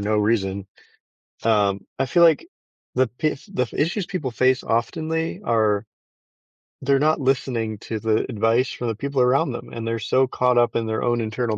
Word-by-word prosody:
no 105 Hz, +1 st, 0 dB
reason. 100 Hz, -2 st, 0 dB, 0.8 s
Um, 100 Hz, -3 st, +2 dB
I 135 Hz, -, +1 dB
feel 170 Hz, +7 st, +3 dB
like 165 Hz, -, +5 dB, 0.5 s
the 130 Hz, -1 st, +2 dB
p 155 Hz, +7 st, -1 dB
the 125 Hz, -1 st, -1 dB
issues 170 Hz, +5 st, -1 dB
people 175 Hz, -9 st, -3 dB
face 130 Hz, +2 st, +2 dB
oftenly 160 Hz, -, -1 dB
are 110 Hz, -, +2 dB, 1.0 s
they're 135 Hz, 0 st, +2 dB
not 155 Hz, +2 st, +2 dB
listening 125 Hz, -5 st, -1 dB
to 110 Hz, +1 st, -5 dB
the 110 Hz, 0 st, +1 dB
advice 115 Hz, +2 st, +1 dB
from 120 Hz, -, -4 dB
the 115 Hz, -, -1 dB
people 140 Hz, +3 st, -1 dB
around 130 Hz, +2 st, +3 dB
them, 120 Hz, -, -7 dB
and 115 Hz, -1 st, -5 dB
they're 115 Hz, 0 st, -1 dB
so 130 Hz, +5 st, +2 dB
caught 125 Hz, -1 st, +1 dB
up 120 Hz, -1 st, +3 dB
in 115 Hz, -, -1 dB
their 110 Hz, 0 st, -2 dB
own 120 Hz, 0 st, +1 dB
internal 110 Hz, 0 st, -2 dB
120 Hz, 175 wpm, -23 LUFS, 110-135 Hz, 1.0 s, like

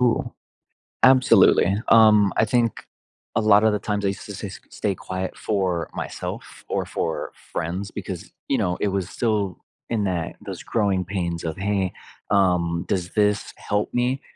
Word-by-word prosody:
Ooh, 120 Hz, -2 st, +1 dB, 0.7 s
absolutely. 115 Hz, -6 st, +6 dB
Um, 105 Hz, -3 st, +6 dB
I 110 Hz, -, +4 dB
think 115 Hz, +1 st, 0 dB, 0.5 s
a -, -, +4 dB
lot 105 Hz, -1 st, +5 dB
of 110 Hz, -, +4 dB
the 105 Hz, -, +1 dB
times 105 Hz, 0 st, -2 dB
I -, -, +3 dB
used 95 Hz, -, -5 dB
to -, -, -7 dB
s -, -, -8 dB
s -, -, -7 dB
stay 100 Hz, -2 st, -1 dB
quiet 95 Hz, +1 st, -5 dB
for 95 Hz, -5 st, -1 dB
myself -, -, -6 dB
or -, -, -1 dB
for -, -, -3 dB, 0.2 s
friends 90 Hz, +5 st, -3 dB
because, -, -, -6 dB, 0.2 s
you 135 Hz, -, +2 dB
know, 90 Hz, -4 st, 0 dB
it 105 Hz, -, +1 dB
was 95 Hz, -2 st, -2 dB
still 105 Hz, -5 st, -1 dB, 0.3 s
in 110 Hz, -3 st, 0 dB
that 90 Hz, -4 st, -2 dB
those -, -, -6 dB
growing 100 Hz, -5 st, 0 dB
pains 85 Hz, -3 st, -3 dB
of, 80 Hz, -1 st, -3 dB
"Hey, 95 Hz, -1 st, 0 dB, 0.4 s
um, 90 Hz, -4 st, +2 dB
does 90 Hz, -1 st, -1 dB
this 105 Hz, -1 st, +1 dB
help 105 Hz, 0 st, -2 dB
me 125 Hz, +2 st, +1 dB
100 Hz, 165 wpm, -23 LUFS, 95-110 Hz, 0.7 s, absolutely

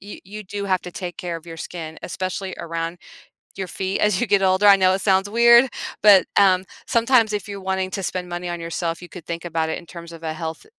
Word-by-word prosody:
y 205 Hz, +1 st, -10 dB
you 210 Hz, +3 st, -8 dB
do 200 Hz, +1 st, -5 dB
have 185 Hz, -2 st, +1 dB
to 180 Hz, -, -8 dB
take 180 Hz, -1 st, -6 dB
care 175 Hz, -2 st, -4 dB
of 165 Hz, +1 st, -13 dB
your 165 Hz, -, -8 dB
skin, 160 Hz, -2 st, -7 dB
especially 185 Hz, +1 st, -4 dB
around 165 Hz, +1 st, -4 dB, 0.6 s
your 190 Hz, -1 st, -4 dB
feet 190 Hz, +2 st, -3 dB
as 210 Hz, -3 st, +2 dB
you -, -, +1 dB
get 200 Hz, -1 st, +3 dB
older; 190 Hz, +1 st, +3 dB
I 200 Hz, -, +9 dB
know 185 Hz, -1 st, +3 dB
it 190 Hz, -, -1 dB
sounds 195 Hz, 0 st, +2 dB
weird, 235 Hz, +3 st, +6 dB, 0.3 s
but, 205 Hz, -3 st, +7 dB
um, 185 Hz, -2 st, +5 dB, 0.2 s
sometimes 230 Hz, -2 st, +3 dB
if 205 Hz, -1 st, -3 dB
you're 200 Hz, -1 st, -7 dB
wanting 190 Hz, 0 st, -2 dB
to 195 Hz, -1 st, -4 dB
spend 180 Hz, -1 st, -3 dB
money 175 Hz, 0 st, -4 dB
on 175 Hz, 0 st, -4 dB
yourself, 165 Hz, 0 st, -3 dB
you 175 Hz, -, -11 dB
could 180 Hz, -3 st, -11 dB
think 170 Hz, +1 st, -5 dB
about 160 Hz, -1 st, -1 dB
it -, -, -2 dB
in 170 Hz, -, -11 dB
terms 170 Hz, 0 st, -10 dB
of 165 Hz, 0 st, -12 dB
a 160 Hz, -1 st, -2 dB
health 160 Hz, 0 st, -6 dB
185 Hz, 245 wpm, -22 LUFS, 170-200 Hz, 0.6 s, I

